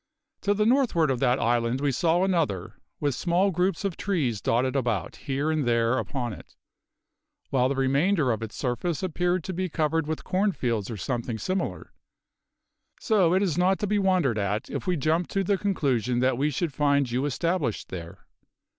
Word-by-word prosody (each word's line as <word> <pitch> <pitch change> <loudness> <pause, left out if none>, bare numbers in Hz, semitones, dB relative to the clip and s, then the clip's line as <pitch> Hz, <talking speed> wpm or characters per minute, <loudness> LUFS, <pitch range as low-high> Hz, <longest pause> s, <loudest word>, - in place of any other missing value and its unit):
To 205 0 +1
the 210 +1 +2
northward 225 - +3
of 130 - -1
that 125 0 +3
island 120 +1 +1
we 145 0 +1
saw 165 +7 +2
another, 155 - 0 0.3
with 145 -2 0
small 180 +7 +1
groups 180 +2 0
of 190 -4 -1
trees 140 - -1
dotted 130 +5 +1
about 120 -8 -1
here 140 +2 -2
and 155 -2 0
there 115 0 +2
upon 125 -6 -3
it, - - -13 1.0
while 130 -1 +2
the 140 - -1
remainder 140 +3 +2
of 115 - -2
its 115 -1 -6
surface 150 +7 -2
appeared 180 0 0
to 185 - -4
be 185 +1 -2
covered 155 0 0
with 160 0 -3
corn 195 +2 +1
fields 115 - -2
or 115 - -5
something 120 +2 -3
similar; 185 - -3 1.1
so 190 -7 +3
it 190 - +3
is 175 -3 0
not 190 +2 +3
to 210 - -2
be 205 +1 +1
wondered 180 - +2
at 100 +2 -2
if - - -4
we 180 -2 +1
jumped 160 +4 0
to 195 - +1
the 200 +2 +2
conclusion 135 - 0
that 130 +1 +2
we 140 +4 +1
should 150 +1 -2
find 140 -3 +2
you 130 +4 0
established 145 - -1
there. 85 -2 -8
145 Hz, 185 wpm, -26 LUFS, 125-180 Hz, 1.1 s, northward